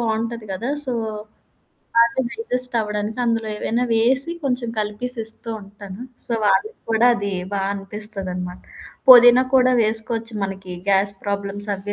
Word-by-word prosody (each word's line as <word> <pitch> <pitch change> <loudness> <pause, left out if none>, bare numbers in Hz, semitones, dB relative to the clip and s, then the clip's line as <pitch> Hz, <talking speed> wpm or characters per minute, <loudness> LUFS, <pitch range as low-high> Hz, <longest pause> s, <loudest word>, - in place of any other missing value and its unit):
బావుంటది 230 0 -2
కదా! 230 +8 -3
సో, 260 - -3 1.0
బాగా 235 +2 +4
డైజెస్ట్ 255 - +1
అవ్వడానికి 210 +1 -4
అందులో 230 -1 0
ఏవైనా 235 +3 -1
వేసి 255 +7 +2
కొంచెం 250 -3 -1
కలిపేసి 215 +4 -1
ఇస్తూ 225 +1 -1
ఉంటాను. 200 +1 -11 0.2
సో, - - -4
వాళ్ళకి 435 - +1
కూడా 225 +2 +4
అది 200 -1 -3 0.2
బా 195 - -1
అనిపిస్తదనమాట. 195 -3 -6 0.5
పొదినాా 245 0 +9
కూడా 255 0 +4
వేసుకోవచ్చు 225 +1 -1
మనకి 190 -1 -7 0.2
గ్యాస్ 200 +1 +2
ప్రాబ్లమ్స్ 200 0 -2
అవ్వి 200 +2 -6
220 Hz, 130 wpm, -21 LUFS, 200-245 Hz, 1.0 s, పొదినాా